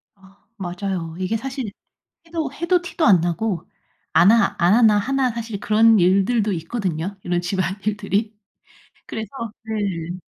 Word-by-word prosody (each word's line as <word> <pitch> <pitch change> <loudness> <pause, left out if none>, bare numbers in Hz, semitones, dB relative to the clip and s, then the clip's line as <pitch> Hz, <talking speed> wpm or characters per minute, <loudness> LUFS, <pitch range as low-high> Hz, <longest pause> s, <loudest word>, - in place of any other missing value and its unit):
아 195 0 -21 0.2
맞아요. 180 -3 -4
이게 190 +5 -1
사실 260 -3 -5 0.5
해도 325 -4 -3
해도 350 +3 +1
티도 340 -1 -2
안 185 -6 +6
나고 175 +1 -2 0.4
안 195 +5 +6
하 230 -3 +3
안 175 +4 +4
하나 220 -3 +5
하나 260 +3 +1
사실 225 -3 -5
그런 220 0 +4
일들도 200 +4 +3
있거든요 180 0 -3
이런 175 0 0
집안일들이. 200 +4 -1 0.7
그래서 220 -2 -5 0.4
네. 190 -6 -3
205 Hz, 265 characters per minute, -22 LUFS, 185-225 Hz, 0.7 s, 안